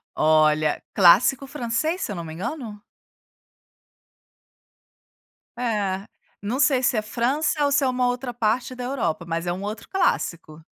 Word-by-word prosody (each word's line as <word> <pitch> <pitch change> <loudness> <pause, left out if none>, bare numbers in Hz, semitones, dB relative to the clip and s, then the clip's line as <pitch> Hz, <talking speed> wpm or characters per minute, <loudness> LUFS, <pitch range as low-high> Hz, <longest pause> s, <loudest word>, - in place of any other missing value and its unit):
Olha, 155 -1 +3
clássico 200 +9 +5
francês 295 +6 -2
se - - -3
eu - - -4
não 170 - -5
me 160 -1 -8
engano? 215 - -6 2.8
É, 205 -5 -1 0.3
não 225 +7 -3
sei 260 -2 +3
se 250 -1 +2
é 215 - 0
França 275 +8 0
ou 285 - +1
se 285 0 +3
é - - +2
uma 250 0 +1
outra 245 0 -2
parte 240 +2 -1
da 250 0 -6
Europa, 225 - -2
mas 165 +1 -3
é 175 - 0
um 185 +2 -6
outro 210 +2 -6
clássico. 165 - -1
230 Hz, 150 wpm, -23 LUFS, 180-260 Hz, 2.8 s, clássico